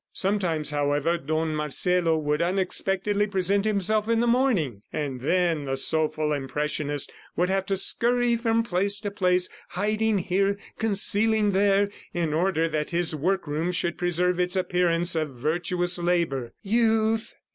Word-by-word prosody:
Sometimes, 180 -7 0
however, 145 +3 0
Don 155 +2 -2
Marcelo 165 +3 +1
would 150 0 -1
unexpectedly 195 +3 0
present 200 0 0
himself 215 +1 0
in 230 0 +2
the 240 - +2
morning, 230 - +1
and 135 -4 -4
then 170 0 +1
the 135 0 -2
soulful 155 +1 +1
impressionist 145 +1 -2 0.2
would 180 +1 +1
have 195 0 -1
to 195 - 0
scurry 240 +4 +2
from 230 -1 +1
place 200 0 +1
to 205 -2 -4
place, 180 -2 +1 0.2
hiding 215 +3 0
here, 195 +2 0 0.2
concealing 215 0 +3
there, 200 +1 +3 0.3
in 165 -3 -1
order 165 0 +1
that 155 -2 -2
his 170 -2 0
workroom 165 0 -1
should 175 -1 -1
preserve 180 0 0
its 180 +1 0
appearance 180 -2 +1
of 155 -5 -2
virtuous 175 +6 -1
labor. 170 -8 -1
"Youth 220 +1 +1
180 Hz, 140 wpm, -25 LUFS, 155-200 Hz, 0.3 s, concealing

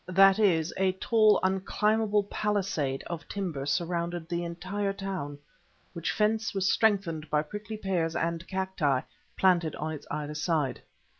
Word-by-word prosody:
That 195 +2 +6
is, 170 -6 +3
a 190 -1 +2
tall, 215 +2 +4
unclimbable 210 +3 +2
palisade 195 -10 -1
of 165 -3 -6
timber 170 -9 -3
surrounded 170 +1 -1
the 170 0 -2
entire 190 +4 -3
town, 190 -8 -4 0.6
which 170 -2 -2
fence 220 0 0
was 190 -1 +1
strengthened 185 -8 +1
by 150 0 +2
prickly 210 +6 -7
pears 175 -5 -1
and 170 +1 -2
cacti 190 -9 0 0.4
planted 175 -4 +3
on 155 +1 -3
its 155 - -8
either 150 0 -3
side. 150 -3 -1
180 Hz, 140 wpm, -29 LUFS, 160-200 Hz, 0.6 s, That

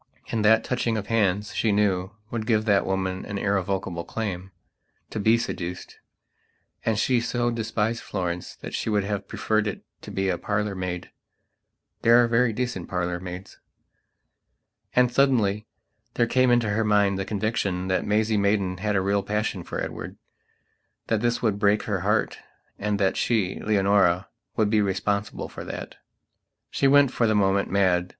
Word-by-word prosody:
And 110 -2 0
that 110 +1 +5
touching 120 -3 -1
of 105 - -3
hands, 105 -2 +1
she 110 - +1
knew, 95 -3 +1 0.2
would 110 -2 -3
give 110 -2 +2
that 100 -3 +3
woman 95 -1 -1
an 100 - -5
irrevocable 95 -3 -1
claimto 95 -1 -4 0.7
be 110 +3 +4
seduced. 90 -5 -5 0.8
And 110 -2 +1
she 120 +1 +2
so 120 0 0
despised 115 0 -1
Florence 90 -3 -4
that - - -7
she - - -2
would 105 -2 +2
have 100 -1 -3
preferred 110 -1 0
it 105 - -5 0.2
to - - -10
be 95 0 -1
a 90 -2 0
parlour 105 0 -1
maid. 90 -2 -5 0.9
There 115 +1 +6
are - - +2
very 115 +1 +3
decent 115 -5 -3
parlour 90 -1 -2
maids. 90 +1 -8 1.4
And, 125 -1 +4
suddenly, 110 -7 +2 0.5
there 120 - +3
came 130 +2 +3
into 120 -3 +3
her 110 +2 +1
mind 100 -2 +2
the - - 0
conviction 95 -2 -1
that 95 - +1
Maisie 110 +1 +1
Maidan 100 -2 +1
had 105 +2 -1
a 95 - +3
real 100 +1 +1
passion 105 -3 -2
for - - -5
Edward; - - -5 0.9
that 110 -2 +1
this 120 0 0
would 105 -3 +1
break 105 0 +3
her - - -1
heartand 105 0 -2
that 95 -1 +1
she, 105 -6 0
Leonora, 100 -3 +2 0.3
would 105 -2 +1
be 110 -1 +4
responsible 100 +1 -1
for - - -8
that. - - -7 0.7
She 140 - +2
went, 140 -1 +5
for 115 - +1
the 110 - +2
moment, 100 -1 +2
mad. 90 -2 +2
105 Hz, 160 wpm, -25 LUFS, 95-110 Hz, 1.4 s, There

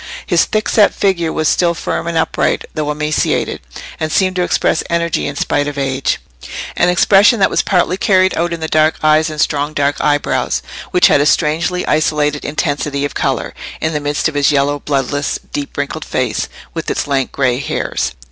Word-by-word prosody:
His - - +2
thickset 215 -1 +2
figure 170 -5 +1
was 155 -1 0
still 170 +1 +2
firm 165 - -3
and 170 -1 -1
upright, 160 - 0
though 150 -2 -2
emaciated, 150 +1 -1 0.4
and 155 -1 -2
seemed 185 +1 +1
to - - +2
express 175 - +1
energy 170 -1 0
in 145 - -5
spite 145 0 0
of 145 -1 -5
age—an 135 - -2
expression 200 +5 +5
that 190 - +3
was - - +2
partly 180 -1 +1
carried 190 -2 +3
out 170 +1 -1
in 170 -1 -4
the 160 - -2
dark 155 0 +3
eyes 155 +1 +4
and 155 -1 -7
strong 145 0 0
dark 145 -1 0
eyebrows, 145 -1 0 0.3
which 180 - +4
had 145 - +5
a 145 - +2
strangely 170 +4 +1
isolated 150 -1 +1
intensity 145 -2 -1
of 145 - -4
colour - - -2 0.3
in 160 +1 -1
the 150 - 0
midst 145 +1 -1
of 160 - -4
his 145 0 +2
yellow, 145 0 +1
bloodless, 145 0 -1 0.2
deep 145 -1 -5
wrinkled 145 0 -3
face - - -2 0.2
with - - -4
its - - -1
lank 135 -2 -1
grey 130 -3 0
hairs. 65 - -2
155 Hz, 185 wpm, -16 LUFS, 145-170 Hz, 0.4 s, expression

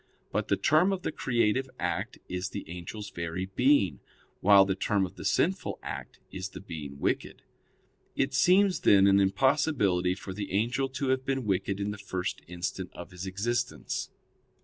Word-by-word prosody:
But - - -1
the - - +2
term 160 +6 +4
of 190 -2 -3
the - - -1
creative 125 0 +1
act - - -2
is 90 +1 -3
the - - -6
angel's 90 +5 -7
very 85 +2 -3
being, 125 +1 +2 0.4
while 100 0 +7
the 95 - 0
term 95 +1 +1
of 90 - -9
the - - -9
sinful 185 +3 +1
act - - -7
is 95 0 -5
the - - -9
being 75 -7 -7
wicked. - - -2 0.7
It 135 - 0
seems, 185 +6 +4
then, 100 -1 +6
an 100 0 +5
impossibility 100 - +2
for 95 - -7
the 100 0 -5
angel 120 +6 +1
to 130 +1 -2
have 130 0 +1
been 135 -2 -1
wicked 95 0 0
in 100 +1 -1
the 105 - -7
first 95 -3 -3
instant 90 +1 -4
of 85 - -9
his 90 +1 -7
existence. 120 +6 -2
100 Hz, 170 wpm, -29 LUFS, 95-130 Hz, 0.7 s, while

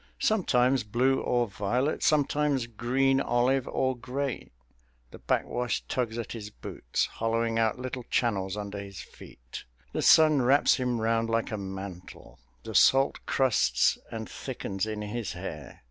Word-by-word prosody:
Sometimes 130 - +2
blue 125 +5 +1
or 120 -1 +1
violet, 120 +8 -1
sometimes 145 -3 +2
green 130 +4 +1
olive 125 +2 +1
or 130 0 0
gray. 130 +2 -4 0.6
The - - -12
backwash 125 0 -1
tugs 120 -3 -2
at 115 - -5
his 105 -3 -6
boots, 60 -10 -3
hollowing 115 0 -1
out 110 0 +1
little 125 0 -5
channels 100 -5 0
under 100 -1 -5
his 100 -1 -8
feet. - - -12 0.3
The - - -1
sun 155 -3 +6
wraps 135 +4 +4
him 125 -3 -1
round 115 0 0
like 115 0 0
a 110 - -2
mantle; 95 -2 -9 0.2
the - - -7
salt 135 +1 +4
crusts 85 - +2
and - - -5
thickens 95 +2 -4
in 105 -1 -4
his 105 -1 -4
hair. 75 -6 -8
120 Hz, 145 wpm, -28 LUFS, 105-130 Hz, 0.6 s, sun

